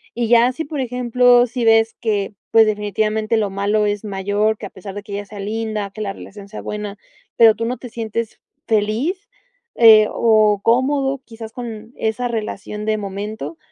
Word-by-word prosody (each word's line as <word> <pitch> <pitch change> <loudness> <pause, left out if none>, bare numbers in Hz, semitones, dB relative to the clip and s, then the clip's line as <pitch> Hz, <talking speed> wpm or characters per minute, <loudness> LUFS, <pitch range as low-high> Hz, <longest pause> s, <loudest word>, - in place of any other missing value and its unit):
Y 235 -1 -1
ya 240 +2 +5
si, 290 +5 -5
por 290 -1 -5
ejemplo, 245 0 +3
si 240 0 -3
ves 225 0 +4
que, 205 -3 -1 0.2
pues, 225 -1 +6
definitivamente 215 +1 0
lo 210 -2 +1
malo 205 +2 0
es 205 0 -2
mayor, 205 +2 -1
que 200 - -6
a - - -14
pesar 190 +1 -10
de 205 - -6
que 205 0 -13
ella 205 +1 -4
sea 205 0 -10
linda, 215 0 -3
que 215 +2 -9
la 200 -2 -3
relación 200 0 -12
sea 215 - -7
buena, 210 -1 -5 0.4
pero 225 -2 +6
tú 230 - -3
no 250 +2 -2
te 245 - -10
sientes 230 -1 -4 0.3
feliz, 225 - 0 0.5
eh, 220 -2 +7
o 215 -3 +3
cómodo 270 +3 +1
quizás 225 -1 -10
con, 230 -1 -8
esa 220 +3 -1
relación 210 -2 -5
de 215 0 +1
momento, 200 -5 -6
220 Hz, 185 wpm, -19 LUFS, 205-235 Hz, 0.5 s, eh